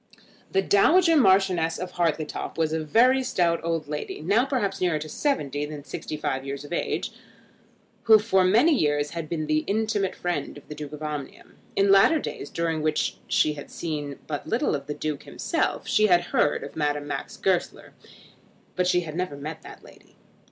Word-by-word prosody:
The 195 0 +2
Dowager 330 - +4
Marchioness 190 - +3
of 180 0 -5
Hartletop 165 -3 -2
was 160 -1 0
a 160 -1 -1
very 250 - +4
stout 170 -9 +1
old 165 -2 -2
lady, 150 0 -5
now 205 +10 +2
perhaps 205 -8 -2
nearer 175 -4 +2
to 155 +1 -6
seventy 145 - -1
than 150 -1 -6
sixty 155 - -6
five 135 -3 -2
years 140 +1 -6
of 145 - -7
age, - - -2 0.9
who 220 -1 +8
for 205 -3 +2
many 225 - +4
years 145 - +1
had 165 -2 -5
been 160 -2 -2
the 155 0 +1
intimate 210 -2 0
friend 175 -5 -3
of 145 - -15
the - - -7
Duke 150 -1 -8
of 150 +1 -8
Omnium. 150 -3 -6 0.2
In 195 0 +3
latter 195 +11 +6
days, 210 - -5
during 165 -2 -1
which 155 0 0
she 155 - +2
had 145 -1 -9
seen 145 -4 -4
but 145 -2 -5
little 240 +6 0
of 140 -1 -4
the 150 - -4
Duke 155 -2 -3
himself, - - -2
she 215 0 +4
had 175 -3 +5
heard 145 - +2
of - - -9
Madame 145 -1 -1
Max 145 - -5
Goesler, - - -1 0.8
but 180 0 +1
she 180 -1 +3
had 160 -3 -7
never 180 -5 -3
met 155 +3 -7
that - - -12
lady. - - -18
165 Hz, 185 wpm, -25 LUFS, 150-195 Hz, 0.9 s, who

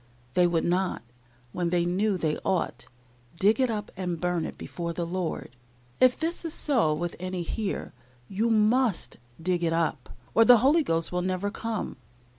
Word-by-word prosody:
They 180 -1 +4
would 170 -2 +1
not, 180 -3 0 0.5
when 175 +3 -1
they 175 0 +1
knew 190 +3 +1
they 155 -3 0
ought, 175 -10 -1 0.5
dig 210 +4 +4
it 260 -1 +3
up 210 -2 -3
and 180 -3 -3
burn 175 -2 0
it - - -9
before 170 -1 -5
the 170 0 -2
Lord. 170 -7 -4 0.4
If 255 -1 +5
this 330 +2 -2
is 330 -2 -3
so 245 - +2
with 170 +3 -2
any 185 -1 -3
here, 200 +4 -3 0.3
you 215 +4 0
must 220 - +2 0.2
dig 175 +1 0
it 165 -1 +1
up, 165 -1 -1 0.2
or 225 - +6
the 245 +1 +8
Holy 310 +5 +5
Ghost 165 - 0
will 180 0 0
never 185 +2 -1
come. 225 -5 -4
185 Hz, 175 wpm, -27 LUFS, 170-220 Hz, 0.5 s, the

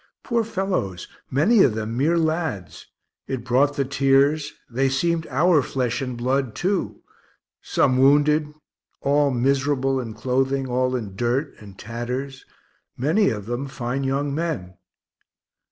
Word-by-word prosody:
Poor 235 -2 0
fellows, 190 - -3 0.2
many 185 - +4
of 115 - +4
them 110 +1 -3
mere 155 +7 +2
lads 160 - -2 0.4
it 130 -2 -4
brought 135 +3 +2
the 140 - 0
tears; 140 +2 +2 0.2
they 135 +3 0
seemed 165 +4 0
our 155 +4 +3
flesh 125 -1 -2
and 125 -2 -4
blood 130 0 -1
too, 190 +1 -2 0.6
some 130 0 +1
wounded, 150 +2 +4 0.5
all 145 +1 +3
miserable 135 +1 +1
in 115 -4 -6
clothing, 130 +3 0
all 130 +1 0
in 105 -6 -5
dirt 120 +6 -1
and 100 -3 -13
tatters 125 +4 -5 0.5
many 165 - +2
of 105 -3 -4
them 120 +5 -3
fine 130 0 -3
young 140 +1 -1
men. 145 - -3
135 Hz, 135 wpm, -23 LUFS, 125-150 Hz, 0.6 s, many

